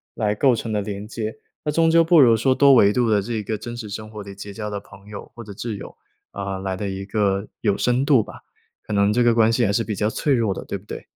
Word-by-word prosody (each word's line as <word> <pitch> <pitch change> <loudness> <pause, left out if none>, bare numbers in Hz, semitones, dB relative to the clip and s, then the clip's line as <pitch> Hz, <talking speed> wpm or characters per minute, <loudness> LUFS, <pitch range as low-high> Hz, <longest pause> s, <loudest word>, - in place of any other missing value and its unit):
来 105 -2 0
构 130 +3 +3
成 115 -1 -3
的 105 - 0
连 100 0 -6
接。 110 +2 -5 0.3
那 150 - -1
终 165 +2 +3
究 165 0 +5
不 165 0 +5
如 120 -5 +6
说 130 +4 +2
多 140 +1 +6
维 100 -5 +6
度 120 +1 +1
的 105 -2 +3
这 110 +2 -3
个 105 +1 -3
真 120 +3 -7
实 110 -3 -7
生 110 +1 -7
活 105 -1 -8
里 100 -1 -10
结 100 +1 -8
交 105 +1 -5
的 105 -1 -4
朋 95 +1 -17
友 105 -1 -9
或 120 - -10
者 100 - -9
挚 110 +2 -5
友， - - -10 0.4
啊， 100 -1 -4
来 95 0 -3
得 100 +1 -4
一 95 0 -5
个 100 -1 0
有 100 -3 +1
深 125 +2 +1
度 140 -5 +5
吧。 - - -11 0.4
可 - - -9
能 100 0 +3
这 120 +2 +3
个 120 -1 +4
关 115 -1 +4
系 120 +1 +2
还 100 - +1
是 115 +3 0
比 105 - -3
较 105 +2 0
脆 145 +5 0
弱 115 -6 +1
的， - - -8
对 - - -4
不 95 - -18
对？ - - -8
110 Hz, 305 characters per minute, -22 LUFS, 100-120 Hz, 0.4 s, 如